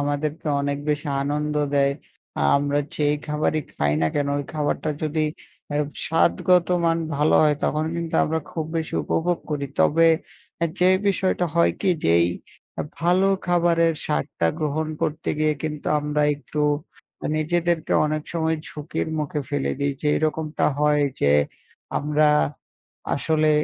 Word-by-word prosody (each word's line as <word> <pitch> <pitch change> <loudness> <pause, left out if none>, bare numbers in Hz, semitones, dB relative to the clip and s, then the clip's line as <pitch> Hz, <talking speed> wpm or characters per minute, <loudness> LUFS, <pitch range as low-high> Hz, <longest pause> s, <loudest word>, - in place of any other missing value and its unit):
আমাদেরকে 145 +2 -2
অনেক 140 0 -1
বেশি 150 +1 -1 0.2
আনন্দ 150 +1 -1 0.2
দেয়। 140 0 +3 0.6
আমরা 145 0 0 0.2
যে 150 - +1 0.2
খাবারই 150 +1 0
খাই 75 0 0
না - - +4
কেন 145 -1 0
ওই 145 - -3
খাবারটা 150 +1 -1
যদি 155 0 0 0.5
আ - - -2 0.3
স্বাদগত 170 +1 +3 0.2
মান 165 0 +2 0.2
ভালো 150 +2 +3
হয় 150 -1 +3
তখন 155 +1 0
কিন্তু 170 -1 -4
আমরা 160 +1 -1
খুব 160 - -3
বেশি 160 -1 -3
উপভোগ 175 +1 0
করি। 145 -2 -1
তবে 165 +2 +5 0.7
যে 180 - +5 0.2
বিষয়টা 190 -2 +1
হয় 170 0 +4
কি, 195 - +2
যেই 85 +1 +4 0.7
ভালো 180 +3 +3 0.2
খাবারের 170 -1 +3
স্বাদটা 75 +3 -1
গ্রহণ 155 +1 -1
করতে 155 +2 -2
গিয়ে 155 0 +2
কিন্তু 150 -2 -4
আমরা 150 0 0
একটু 145 +1 -6 0.8
নিজেদেরকে 170 +1 0
অনেক 155 0 -2
সময় 160 -1 0
ঝুঁকির 150 +1 -4
মুখে 150 0 -2
ফেলে 145 -1 -1
দেই। 140 0 +1
যেইরকমটা 155 +1 0
হয় 150 0 +3 0.2
যে 70 - +4 0.7
আমরা, 150 +1 +2 0.9
আসলে 155 +1 +2
155 Hz, 135 wpm, -23 LUFS, 145-165 Hz, 0.9 s, তবে